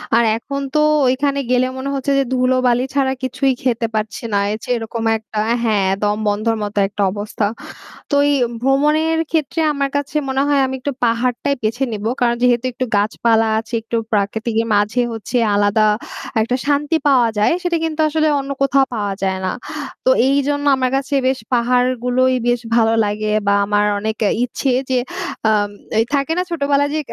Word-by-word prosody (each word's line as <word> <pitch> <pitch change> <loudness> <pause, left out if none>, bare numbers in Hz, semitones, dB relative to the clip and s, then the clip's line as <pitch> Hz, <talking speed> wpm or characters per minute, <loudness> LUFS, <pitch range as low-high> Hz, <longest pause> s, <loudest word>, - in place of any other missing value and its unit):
আর 235 - +4
এখন 275 +4 -5
তো 305 - +4 0.3
ওইখানে 280 +2 +1
গেলে 250 0 +3
মনে 270 +1 -4
হচ্ছে 275 +1 -1
যে 275 - +3
ধুলোবালি 255 -1 +2
ছাড়া 270 -1 +1
কিছুই 265 +1 0
খেতে 235 -3 0
পারছি 215 0 -3
না। 200 - +3 0.3
যে - - -9
এরকম 225 0 -5
একটা 215 -1 -6 0.2
হ্যাঁ, 210 -4 +2 0.2
দমবন্ধর 210 +2 0
মতো 205 0 -5
একটা 200 +1 -5
অবস্থা। 205 +1 -3 0.7
তো 285 - +3
এই - - +3 0.3
ভ্রমণের 300 +5 +2
ক্ষেত্রে 320 0 -1
আমার 280 -1 -1
কাছে 285 +1 -3
মনে 265 +1 0
হয় 285 -1 +3
আমি 265 - -4
একটু 285 +3 -3
পাহাড়টাই 245 +4 0
বেছে 225 +5 -1
নেবো। 215 +1 -3
কারণ 240 -1 +3
যেহেতু 245 0 +3
একটু 255 0 -2
গাছপালা 225 +2 +2
আছে 225 +2 -11
একটু 230 +1 -5 0.2
প্রাকৃতিকের 220 +2 0
মাঝে 210 +4 +1
হচ্ছে 225 +3 -3 0.2
আলাদা 205 +1 +2 0.6
একটা 230 +3 0
শান্তি 290 +2 +1
পাওয়া 255 -4 +4
যায়। 210 - +3
সেটা 350 -1 +1
কিন্তু 315 -1 -2
আসলে 310 0 +1
অন্য 275 0 -5
কোথাও 275 0 +3
পাওয়া 205 -2 -2
যায় 190 0 0
না। 185 - 0 0.5
তো - - +4 0.2
এইজন্য 285 +1 0
আমার 255 -1 +1
কাছে 275 +1 -2
বেশ 260 0 0
পাহাড়গুলোই 250 +1 +2
বেশ 240 0 +2 0.2
ভালো 225 -1 +3
লাগে 210 +1 -2 0.2
বা 200 - +4
আমার 205 0 +1
অনেক 215 +1 -3 0.3
ইচ্ছে 260 +2 -2 0.2
যে 260 - +2 0.5
আ - - +4 0.6
থাকে 280 +1 0
না 360 - +1
ছোটোবেলায় 285 -3 +1
যে - - 0
250 Hz, 170 wpm, -18 LUFS, 220-275 Hz, 0.7 s, আর